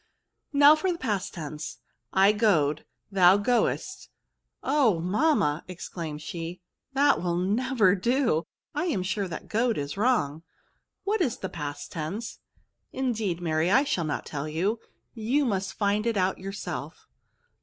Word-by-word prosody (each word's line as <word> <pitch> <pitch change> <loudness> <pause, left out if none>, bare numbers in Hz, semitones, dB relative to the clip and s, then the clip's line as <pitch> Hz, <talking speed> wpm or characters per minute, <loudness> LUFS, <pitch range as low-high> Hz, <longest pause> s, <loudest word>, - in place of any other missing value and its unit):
S36 - - -41
VERBS. 285 - -9
Now 290 +2 +9
for 370 +4 0
the 345 - -3
past 210 - -2
tense. 155 -2 -6 0.3
I 195 +2 +5
goed, 170 -9 +2 0.3
thou 190 0 +6
goedst 235 +4 0 0.3
— - - -55 0.2
oh! 265 - +3
mamma/' 180 - +2
exclaimed 165 -4 -6
she, 170 +2 -6 0.3
that 280 +1 +4
will 175 -1 0
never 210 +2 +2
do! 230 - +1 0.3
I 300 +4 -1
am 275 - 0
sure 195 +1 -1
that 170 - -7
goed 230 +1 +1
is 145 +4 -4
wrong; 200 - +1 0.6
what 415 0 0
is 255 -9 +1
the 190 - -5
past 145 -2 -6
tense?'' 185 +9 -5 0.3
'* - - -52
Indeed, 220 -9 -1
Mary, 160 0 +1
I 265 +8 +5
shall 180 - -1
not 150 - -3
tell 145 +1 -4
you; 190 +9 0 0.3
you 245 +6 +1
must 195 -4 -1
find 210 +1 +1
it 230 -3 0
out 185 0 +1
yourself." 195 +1 -6
195 Hz, 155 wpm, -27 LUFS, 170-240 Hz, 0.6 s, Now